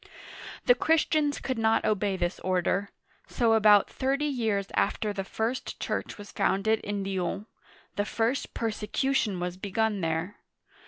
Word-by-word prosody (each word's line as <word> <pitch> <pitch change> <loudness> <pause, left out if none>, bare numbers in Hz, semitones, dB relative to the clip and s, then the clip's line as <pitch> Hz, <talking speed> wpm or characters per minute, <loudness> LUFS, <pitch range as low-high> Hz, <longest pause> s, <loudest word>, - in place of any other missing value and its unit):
The 245 - +7
Christians 305 +1 +2
could 260 -3 -3
not 225 0 +2
obey 205 -2 +1
this 175 0 -2
order; 185 +2 0 0.4
so 230 -2 +2
about 210 -2 +6
thirty 275 +2 -1
years 220 -8 -1
after 210 -1 0
the 195 -1 -3
first 225 +6 -3
church - - -3
was 205 -1 -10
founded 220 +3 +1
in 205 -1 -3
Lyons, 195 +1 -2 0.5
the 205 - +1
first 230 +5 -1
persecution 225 -1 -1
was 180 0 -3
begun 205 +1 -1
there. 165 +4 -2
210 Hz, 140 wpm, -28 LUFS, 195-235 Hz, 0.5 s, The